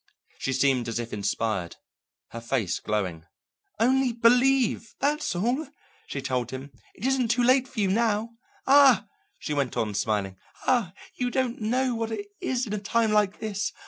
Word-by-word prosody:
She 135 - -2
seemed 130 -2 +2
as 115 - -2
if 120 0 -5
inspired, 100 -3 -2 0.5
her 115 - -7
face 115 -6 -1
glowing. 95 -6 -3 0.5
"Only 260 +2 +3
believe; 245 0 +3
that's 290 -9 0
all," 245 - 0 0.4
she 135 - -5
told 125 -3 -1
him. 130 +2 -7 0.2
"It 210 - -7
isn't 265 -2 +2
too 240 +2 +2
late 260 +1 +4
for 245 - -7
you 200 - +2
now. 220 +2 +1 0.3
Ah," 270 -6 +6 0.3
she 150 - -4
went 140 -4 -1
on, 105 -2 -1
smiling, 100 -2 -1 0.3
"ah, 235 -8 +2 0.2
you 250 -1 -2
don't 250 -2 -1
know 250 +4 +1
what 225 -1 -3
it 210 -2 -4
is 255 0 -1
in 210 - -5
a 210 - -1
time 220 +2 +1
like 210 -2 +2
this! 205 -2 -3
210 Hz, 170 wpm, -26 LUFS, -, 0.5 s, Ah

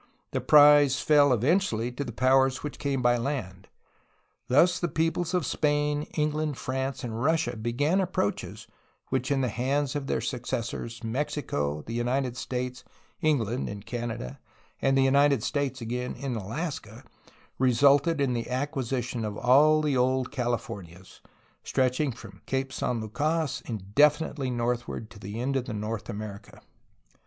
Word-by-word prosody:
The - - -1
prize 145 -3 +6
fell 145 -2 +5
eventually 125 - +1
to 135 +3 -4
the 120 - -6
powers 130 +2 +3
which 150 - -6
came 135 -3 -1
by 120 0 +4
land. 115 -8 -4 0.8
Thus 165 +8 +4
the 175 - 0
peoples 165 +3 -1
of 175 -5 +1
Spain, 145 0 0
England, 150 -1 0
France, 130 +1 -3
and 115 -1 -4
Russia 160 -2 +1
began 135 - +1
approaches 175 - -2 0.4
which 130 -1 -1
in 140 -2 +1
the 130 - +1
hands 135 +5 -1
of 140 -2 -3
their - - 0
suc 125 -4 -3
cessors 115 0 -4
Mexico, 110 - -2
the 115 - -7
United 125 +1 -1
States, 125 0 -4 0.4
England 130 - 0
(in 100 0 -7
Canada), 115 - -5 0.4
and 135 0 +3
the 135 - +4
United 140 -2 +4
States 140 -3 -2
again 125 +2 -3
(in 135 -3 -4
Alaska) 115 - -5 0.6
resulted 140 +5 +4
in 135 -3 +1
the 115 -1 -3
acquisition 130 -3 -2
of 105 -1 -4
all 145 +5 +5
of - - -2
the 145 -2 +1
old 130 0 +1
"Calif 120 -4 -1
ornias," 90 -1 -10 0.4
stretching 130 +2 +1
from 110 -4 -12
Cape 135 0 -2
San 120 -2 -1
Lucas 145 +6 -1
indefinitely 135 - +1
northward 120 -2 -2
to 105 - -13
the 105 +3 -6
end 135 +3 -1
of 130 -2 -1
North 105 -1 -4
America. 100 -1 -7
130 Hz, 150 wpm, -27 LUFS, 115-145 Hz, 0.8 s, prize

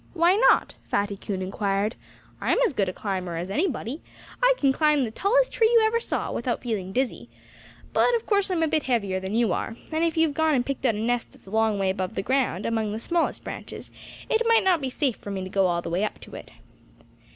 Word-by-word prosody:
"Why 340 +1 +4
not?" 425 +5 +4
Fatty 200 0 0
Coon 195 -1 -4
inquired. 200 +2 -1 0.5
"I'm - - +2
as 415 - -1
good 200 -6 0
a - - -2
climber 185 -3 -4
as 180 +3 -4
anybody. 285 - -2 0.4
I - - +5
can 275 -2 +3
climb 300 -1 +3
the 225 - -3
tallest - - +2
tree 445 -1 +3
you 460 -2 +5
ever 455 +1 +2
saw, - - -3
without 240 0 -2
feeling 205 -6 -3
dizzy. 255 +4 -2 0.6
But - - +3
of 460 - -2
course 405 -2 +1
I'm 345 -3 +1
a - - +2
bit 310 0 +1
heavier 200 -8 0
than 190 +3 -4
you 230 -5 +2
are. 225 - -3 0.2
And 315 +1 0
if 335 0 0
you've 320 -2 +3
gone 315 0 +2
and 245 -2 +1
picked 275 -1 -1
out 225 - +1
a - - -4
nest 240 +2 -1
that's - - -20
a 190 - -12
long 220 -1 +2
way 195 -1 +1
above 190 -1 -4
the - - -2
ground, 255 -7 0
among 220 -2 -1
the 220 - -4
smallest 335 +7 -1
branches, - - -8 0.4
it 450 - +1
might 460 -1 +5
not 365 -4 +3
be 265 - -2
safe 260 -2 -1
for - - -9
me 195 -1 -3
to 185 - -6
go 195 0 +2
all 170 -1 -1
the - - -4
way 180 +4 0
up 215 - -3
to - - -13
it." - - -9
240 Hz, 240 wpm, -25 LUFS, 200-325 Hz, 0.6 s, I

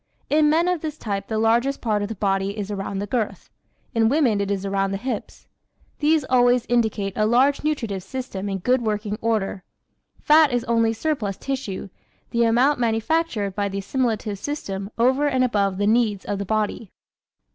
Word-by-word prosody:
In 300 0 +4
men 330 +3 +3
of 360 -3 0
this 310 -1 -4
type 200 -5 -4
the 220 - -2
largest 235 +5 +2
part 215 -3 0
of 205 - -2
the 225 - -5
body 195 0 -1
is 205 0 -4
around 195 0 -4
the 200 - -2
girth; 225 +1 -3 0.4
in 225 -2 +3
women 250 -8 +2
it 200 - -2
is 200 -1 -2
around 195 0 0
the - - -1
hips. 235 0 -5 0.5
These 305 -1 +2
always 245 -1 +3
indicate 220 -5 0
a 215 - +2
large 265 +6 +3
nutritive 230 -11 -2
system 205 -2 -5
in 195 - -2
good 250 +7 +1
working 210 -1 -2
order. 210 -4 -1 0.6
Fat 305 -1 +5
is 245 -1 0
only 230 -1 +2
surplus 225 -5 -2
tissue 260 -8 -4 0.4
the 235 -1 +2
amount 245 +5 +3
manufactured 230 - 0
by 200 0 -1
the 195 - -5
assimilative 215 -1 -1
system 200 -9 -4
over 260 +5 +3
and 260 -3 +2
above 200 -6 +1
the 205 - 0
needs 215 -2 +2
of 200 - -3
the 200 - -3
body. 215 0 -2
225 Hz, 180 wpm, -23 LUFS, 200-260 Hz, 0.6 s, Fat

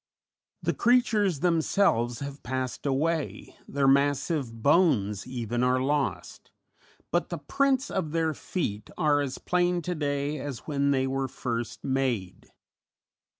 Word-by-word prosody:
The - - +1
creatures 220 - +2
themselves 160 - +2
have 140 0 -6
passed 130 +2 -3
away, 155 +3 -1
their 140 -1 +1
massive 140 -3 +1
bones 120 - +3
even 120 -1 -2
are 125 0 +3
lost, 140 +2 -2 0.6
but 175 - +1
the 175 - -3
prints 270 - +1
of 185 -5 -1
their 160 -1 +1
feet 110 - -4
are 150 -4 +3
as 135 -2 -3
plain 180 -1 +1
to 180 - -2
day 145 -1 -2
as 135 -3 -6
when 140 -2 0
they 135 -2 +2
were 135 0 -1
first 120 -2 -4
made. 125 -9 -2
140 Hz, 130 wpm, -27 LUFS, 130-165 Hz, 0.6 s, bones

